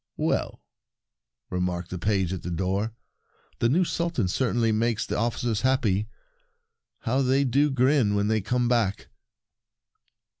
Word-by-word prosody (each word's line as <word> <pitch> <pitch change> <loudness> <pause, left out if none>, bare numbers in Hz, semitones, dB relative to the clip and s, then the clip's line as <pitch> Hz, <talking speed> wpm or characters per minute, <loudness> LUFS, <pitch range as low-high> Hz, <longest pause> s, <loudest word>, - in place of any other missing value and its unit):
"Well," - - -1 0.9
remarked 90 -1 -2
the 90 - -4
page 95 -1 0
at 95 - -5
the 90 - -5
door, 95 +6 -1 0.6
"the 115 - +2
new 170 +8 +3
Sultan 170 - -1
certainly 120 +1 +1
makes 110 0 0
the - - -3
officers 115 -1 -1
happy! 110 -6 +1 0.9
How 130 +3 0
they 135 +1 +3
do 140 +3 +2
grin 130 -5 +2
when 100 0 +1
they 110 0 +1
come 125 +5 0
back 115 -5 0
115 Hz, 135 wpm, -26 LUFS, 95-130 Hz, 0.9 s, new